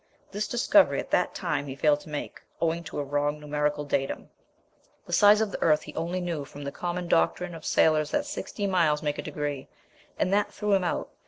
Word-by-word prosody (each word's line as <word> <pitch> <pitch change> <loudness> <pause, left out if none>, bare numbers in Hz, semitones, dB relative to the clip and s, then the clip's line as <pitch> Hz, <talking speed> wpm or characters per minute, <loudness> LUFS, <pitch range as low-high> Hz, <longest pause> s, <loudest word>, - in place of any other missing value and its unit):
This 205 +1 -2
discovery 280 +6 +4
at - - -6
that - - +1
time 150 -6 -2
he 135 - -5
failed 145 +1 +3
to 150 - -13
make, 150 -1 -5 0.2
owing 165 +1 0
to - - -7
a 145 - -1
wrong 145 +1 -1
numerical 150 0 -1
datum. 135 -1 -2 0.7
The - - -7
size 210 +1 +6
of 215 -2 0
the - - -6
earth 155 -2 +3
he 150 - -10
only 170 +3 -2
knew 170 -5 -3
from 145 +1 -10
the 140 - -4
common 175 +3 -4
doctrine 170 - +1
of 165 -2 -9
sailors 155 -1 +3
that 295 - 0
60 290 -7 -4
miles 165 -6 +2
make 145 -1 -1
a - - 0
degree; 145 -3 -4 0.5
and 185 - +1
that 205 0 +2
threw 210 -1 -1
him 190 -2 +3
out. 175 - -2
155 Hz, 215 wpm, -27 LUFS, 145-185 Hz, 0.7 s, size